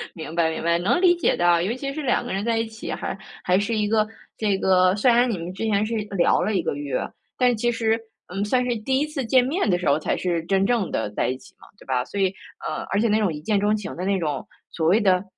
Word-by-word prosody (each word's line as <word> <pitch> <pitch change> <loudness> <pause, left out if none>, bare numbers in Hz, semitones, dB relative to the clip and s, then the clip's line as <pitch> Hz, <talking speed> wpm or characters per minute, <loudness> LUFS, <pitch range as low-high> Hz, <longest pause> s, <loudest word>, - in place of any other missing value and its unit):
明 160 -1 -7
白， 165 -1 +2
明 160 - -4
白， 170 0 +2
能 200 - +2
理 355 -2 +6
解 345 - +1
的， 175 -1 +3
尤 225 +6 -1
其 275 +1 -4
是 310 - -4
2 245 -2 +1
个 245 - -4
人 195 +1 -2
在 230 -1 +1
一 225 - 0
起， 220 0 -7
还 - - -4 0.3
还 180 +2 +3
是 220 +2 -1
一 210 -1 +1
个 215 0 +2 0.3
这 205 -3 +1
个 185 0 +3
虽 240 +4 +4
然 240 +1 +4
你 205 - -1
们 170 +2 -6
之 195 - -5
前 210 -1 +2
是 230 - -4 0.2
聊 170 - +3
了 215 -1 0
1 - - +1
个 - - -1
月， 145 -3 -2 0.4
但 250 -2 +3
其 240 +2 0
实， 225 -1 +1 0.3
嗯， 195 +3 -2
算 250 +4 +1
是 240 -1 0
第 265 +5 0
1 300 - +1
次 300 -3 -4
见 250 +2 +4
面 285 - 0
的 175 - +3
时 180 - -3
候 140 +2 +3
才 - - -1
是 170 -3 -1
真 195 +1 +2
正 230 -5 +1
地 110 - -1
在 - - -1
一 130 - -2
起 190 +6 -18
嘛， - - -16
对 - - -17
吧？ 125 -2 0
所 200 - -6
以 190 0 +2 0.3
呃， - - -3
而 200 - +1
且 230 - +2
那 215 +1 +2
种 200 -5 +1
一 150 - -5
见 205 +3 +1
钟 210 +1 +2
情 210 - -6
的 180 +2 -4
那 195 0 +1
种 150 -5 -2 0.3
所 160 -1 -1
谓 200 +6 +5
的 185 -2 +3
205 Hz, 295 characters per minute, -23 LUFS, 175-230 Hz, 0.4 s, 理